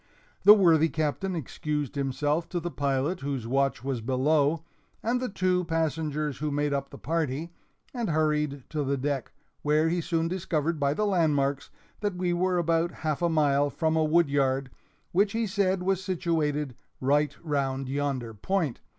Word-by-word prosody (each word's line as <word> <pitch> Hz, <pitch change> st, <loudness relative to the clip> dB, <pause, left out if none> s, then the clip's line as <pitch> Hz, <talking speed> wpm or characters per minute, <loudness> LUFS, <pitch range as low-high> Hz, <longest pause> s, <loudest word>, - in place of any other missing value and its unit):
The 210 Hz, -, +11 dB
worthy 165 Hz, -5 st, +5 dB
Captain 160 Hz, +5 st, -1 dB
excused 150 Hz, -1 st, -3 dB
himself 145 Hz, +4 st, -1 dB
to 175 Hz, -, -2 dB
the 175 Hz, +1 st, -4 dB
pilot 140 Hz, +5 st, 0 dB
whose 135 Hz, -5 st, -3 dB
watch 135 Hz, 0 st, 0 dB
was 130 Hz, -3 st, -2 dB
below 145 Hz, +5 st, +2 dB, 0.4 s
and 245 Hz, +3 st, 0 dB
the 255 Hz, -, -2 dB
two 185 Hz, -2 st, +1 dB
passengers 155 Hz, -3 st, -1 dB
who 150 Hz, +1 st, -1 dB
made 145 Hz, 0 st, 0 dB
up 140 Hz, -, -2 dB
the -, -, -10 dB
party, 160 Hz, 0 st, -2 dB, 0.4 s
and 235 Hz, -6 st, -2 dB
hurried 150 Hz, -3 st, 0 dB
to 150 Hz, -2 st, -1 dB
the 140 Hz, 0 st, 0 dB
deck, 140 Hz, 0 st, -2 dB, 0.3 s
where 155 Hz, +2 st, +2 dB
he 175 Hz, +1 st, 0 dB
soon 165 Hz, 0 st, 0 dB
discovered 170 Hz, -3 st, -1 dB
by 140 Hz, 0 st, +1 dB
the 210 Hz, -, +1 dB
landmarks 145 Hz, -8 st, +1 dB, 0.3 s
that 205 Hz, -3 st, -2 dB
we 180 Hz, -1 st, 0 dB
were 180 Hz, +1 st, +1 dB
about 165 Hz, 0 st, +2 dB, 0.2 s
half 155 Hz, 0 st, 0 dB
a 170 Hz, -, +2 dB
mile 145 Hz, -3 st, +3 dB
from 160 Hz, +2 st, 0 dB
a 160 Hz, -, +3 dB
woodyard, 140 Hz, -4 st, +2 dB, 0.4 s
which 200 Hz, +3 st, +2 dB
he 225 Hz, 0 st, 0 dB
said 190 Hz, -2 st, 0 dB
was 190 Hz, 0 st, 0 dB
situated 160 Hz, -7 st, -1 dB, 0.3 s
"right 145 Hz, +2 st, +1 dB
round 135 Hz, -3 st, -1 dB
yonder 135 Hz, -4 st, -2 dB
point." 160 Hz, -, -1 dB
155 Hz, 165 wpm, -27 LUFS, 140-175 Hz, 0.4 s, The